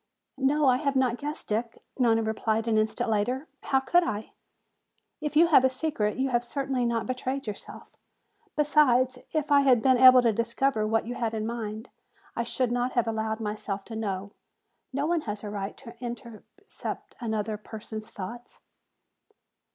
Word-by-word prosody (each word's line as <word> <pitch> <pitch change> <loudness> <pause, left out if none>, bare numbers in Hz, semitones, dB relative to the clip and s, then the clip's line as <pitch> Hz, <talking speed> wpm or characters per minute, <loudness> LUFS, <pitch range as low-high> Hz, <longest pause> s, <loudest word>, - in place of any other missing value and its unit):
"No, 285 +3 +2
I 255 -2 +5
have 280 0 -1
not 255 -2 +2
guessed, 295 +2 -5
Dick," 225 +2 -2 0.2
Nona 225 -2 +3
replied 220 +1 -1
an 225 - +2
instant 215 0 +1
later. 245 +7 0
"How 270 - +2
could 350 +7 +3
I? 215 -9 -4 0.9
If 300 -1 -4
you 325 +3 +7
have 320 -6 +6
a 260 - +5
secret 255 -6 -1
you 265 +1 0
have 240 -1 +1
certainly 265 -1 -1
not 230 -1 -1
betrayed 260 +2 -3
yourself. 210 -2 -8 0.6
Besides, 260 -4 +3
if 305 -1 -1
I 285 0 +7
had 260 -4 +5
been 260 -2 +4
able 255 -1 +9
to 230 -2 +3
discover 230 0 0
what 225 0 +1
you 240 - -4
had 230 -2 -2
in 215 -1 -2
mind, 225 -1 -5 0.5
I - - 0
should 240 +1 0
not 245 +1 0
have 240 - +2
allowed 220 0 -2
myself 210 -2 -4
to 225 - -8
know. 200 -2 -3 0.6
No 275 +2 -1
one 335 0 +1
has 205 0 -3
the 210 - -6
right 200 -1 -5
to 235 -4 -11
interpret 235 - -8
another 220 -2 -2
person's 215 0 -8
thoughts." 235 +5 -8
240 Hz, 170 wpm, -27 LUFS, 220-265 Hz, 0.9 s, able